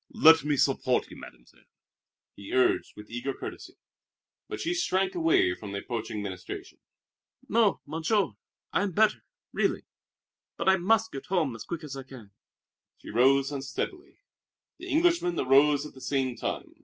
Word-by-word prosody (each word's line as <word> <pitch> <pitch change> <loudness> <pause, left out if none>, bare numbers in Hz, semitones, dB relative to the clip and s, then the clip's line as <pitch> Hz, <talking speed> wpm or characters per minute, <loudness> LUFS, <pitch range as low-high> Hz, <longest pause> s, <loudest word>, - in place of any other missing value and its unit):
"Let 165 - +6
me 150 -1 0
support 130 -2 +1
you, - - -10
Mademoiselle," - - -15 0.7
he 100 - -9
urged 130 0 +2
with 105 +1 -12
eager 120 +3 -3
courtesy. - - -8 0.7
But - - -6
she 340 - -1
shrank 195 - 0
away 165 - +3
from 100 +2 -8
the - - -2
approaching 110 -1 -4
ministration. 95 -2 -7 0.7
"No, 220 -2 +2
Monsieur, 160 +5 0 0.4
I - - +2
am 200 -3 -1
better, 215 +4 +3 0.3
really. - - 0 0.7
But - - -3
I 190 - +5
must 220 +5 +2
get 135 - -8
home 160 -10 0
as 115 - -9
quick 170 -2 -5
as 145 -3 -7
I 135 - -5
can." 130 -6 -13 0.7
She - - -10
rose 135 +4 +4
unsteadily. 145 - -5 0.6
The 365 - -8
Englishman 325 - +2
arose 140 +2 +4
at 150 - -10
the 130 - -14
same 130 -3 -1
time. - - -4
145 Hz, 155 wpm, -28 LUFS, 125-190 Hz, 0.7 s, Let